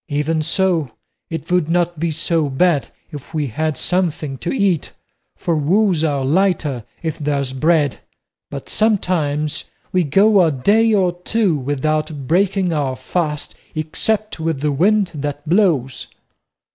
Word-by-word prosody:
Even 150 +2 0
so 170 -2 +1 0.4
it 165 0 -6
would 180 -3 +2
not 175 -1 0
be 170 +1 0
so 160 -1 0
bad 145 +1 +2 0.2
if 145 +2 -9
we 150 -2 0
had 155 +4 -2
something 165 -6 -1
to 170 - -4
eat, 200 - 0 0.4
for 170 - -1
woes 175 +3 +2
are 140 -4 0
lighter 155 - +1 0.2
if 160 0 -3
there's 140 -3 -1
bread; 150 0 +2 0.5
but 140 -2 -7
sometimes 165 -9 0 0.3
we 180 -1 +2
go 195 +7 +4
a 165 - +3
day 210 - +3
or 190 -4 +3
two 200 -2 +1
without 145 +1 -2
breaking 190 +1 +2
our 140 -4 -1
fast, 150 -1 -3 0.2
except 210 +7 -1
with 160 -3 -2
the 150 0 +1
wind 195 +6 +2
that 145 0 -5
blows." 160 - +1
160 Hz, 140 wpm, -19 LUFS, 145-180 Hz, 0.5 s, go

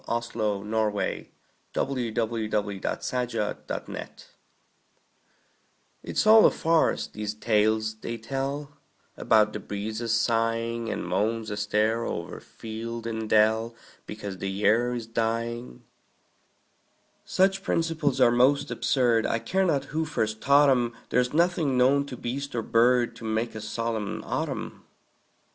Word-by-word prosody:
Paul 120 0 -1 0.4
Laurence 105 -1 -1 0.5
Dunbar 140 - -1
Merry 120 -4 -2
Autumn 110 +1 -2 2.0
IT'S - - -1
all 220 0 +8
a - - +5
farce, 165 0 +1
these 105 0 -5
tales 110 0 +1
they 115 +1 -5
tell 135 +5 -4 0.4
About 110 -1 +3
the - - -4
breezes 110 +2 -2
sighing, 115 0 0
And - - -3
moans 110 +5 -1
astir 105 +2 0
o'er 85 -6 -4
field 115 +1 -7
and 110 -1 -4
dell, 110 +2 +3 0.3
Because 100 -3 -6
the 95 - -3
year 110 +5 +2
is 120 -2 -4
dying. 115 - -3 1.4
Such 195 +1 +2
principles 165 -7 0
are 125 -2 +6
most 130 +4 +3
absurd, 120 -4 +2
I - - +1
care 190 +10 0
not 140 -4 +1
who 160 +1 0
first 110 -8 -2
taught 140 +1 +5
'em; 120 -2 +1
There's 125 0 +2
nothing 165 -4 +2
known 140 +3 +3
to 125 - -7
beast 135 +3 -4
or 115 - -1
bird 120 +2 +3
To - - -12
make 110 +1 -1
a 110 - -6
solemn 110 -1 -3
autumn. - - -4
115 Hz, 125 wpm, -26 LUFS, 110-130 Hz, 2.0 s, all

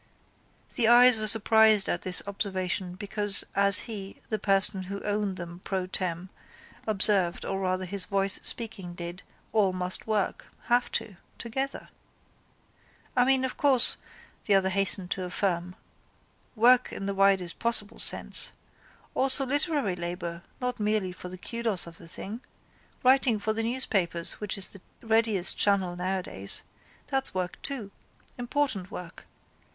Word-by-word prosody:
The 230 - +5
eyes 245 0 +8
were 215 - -2
surprised 220 -1 +6
at 175 - -1
this 185 -1 +4
observation 190 -2 -2
because 205 0 0
as 200 -1 +3
he, 200 -4 -8
the 215 - -2
person 195 -1 +5
who 200 +2 -6
owned 205 -2 -2
them 175 0 -8
pro 190 -2 -2
tem. 180 0 -4 0.6
observed 200 -4 +1
or 195 - -3
rather 185 0 -1
his 195 +1 0
voice 195 -1 0
speaking 200 -7 -4
did, 175 +1 -7 0.3
all 200 -4 +2
must 185 +2 -3
work, 215 -3 -1 0.2
have 245 +1 +1
to, 200 -5 -4 0.2
together. 265 +4 -4 1.3
—I 245 -1 +4
mean, 265 0 +3
of 260 - -5
course, 270 -4 +4 0.5
the 205 - +4
other 190 -1 +3
hastened 190 -1 0
to 185 - -2
affirm, 180 -1 -2 0.8
work 245 +3 +4
in 195 - -6
the 200 - -2
widest 195 -3 +1
possible 230 -3 0
sense. - - 0 0.6
Also 270 +1 +1
literary 285 - 0
labour 175 -1 -5 0.2
not 250 -1 -3
merely 210 -3 0
for 180 0 -9
the 185 - -9
kudos 230 -1 -2
of 170 0 -13
the - - -13
thing. 210 +7 -4 0.6
Writing 255 -3 +5
for 215 +1 -2
the 225 - -1
newspapers 210 -9 -1
which 210 -2 -2
is 195 - +1
the 195 - -9 0.2
readiest 220 -4 +2
channel 190 -3 +2
nowadays. 180 - -3 0.4
That's 270 -6 -1
work 185 -1 -4
too. 235 -8 -5 0.5
Important 245 -7 -1
work. 175 -2 -10
200 Hz, 145 wpm, -27 LUFS, 185-225 Hz, 1.3 s, eyes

